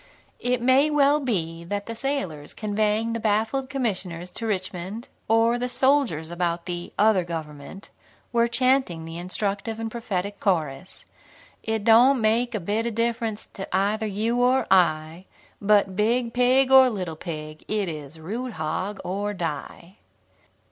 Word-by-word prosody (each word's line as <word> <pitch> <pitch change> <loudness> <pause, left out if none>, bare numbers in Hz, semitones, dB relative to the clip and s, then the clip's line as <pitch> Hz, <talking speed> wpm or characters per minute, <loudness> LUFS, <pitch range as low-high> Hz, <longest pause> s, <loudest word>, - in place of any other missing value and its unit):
It 245 -1 -1
may 265 +4 +4
well 295 0 +4
be 170 - -2
that 200 +3 -3
the 230 - -5
sailors 225 - -4
conveying 215 +1 0
the 230 - -2
baffled 220 +5 0
commissioners 185 -9 -3
to 230 - -4
Richmond, 190 +2 -4 0.2
or 230 +2 +3
the 250 +1 -2
soldiers 250 - +1
about 175 -1 -2
the 175 -1 -5
"other 210 -3 +4
government," 160 +2 -8 0.4
were 235 0 +3
chanting 255 -9 +1
the 165 +1 -7
instructive 200 +4 -2
and 225 -1 -4
prophetic 205 -4 -3
chorus: 160 -4 -2 0.6
"It 220 -1 -2
doan' 240 +4 +6
make 230 +2 +1
a - - -1
bit 210 +6 -1
of 230 - -4
difference 230 -2 -1
to 195 - -6
either 205 +4 +1
you 225 +4 0
or 255 +2 +3
I, 165 -1 +2 0.4
but 200 -2 +3
Big 230 +3 +1
Pig 255 +2 +3
or 265 -1 +8
Little 185 -8 -4
Pig, 155 -2 -7
it 210 -2 -1
is 155 -1 -7
Root, 230 +9 -5
Hog, 180 +6 -3
or 205 +3 -3
Die." 170 +3 -6
210 Hz, 150 wpm, -25 LUFS, 175-235 Hz, 0.6 s, or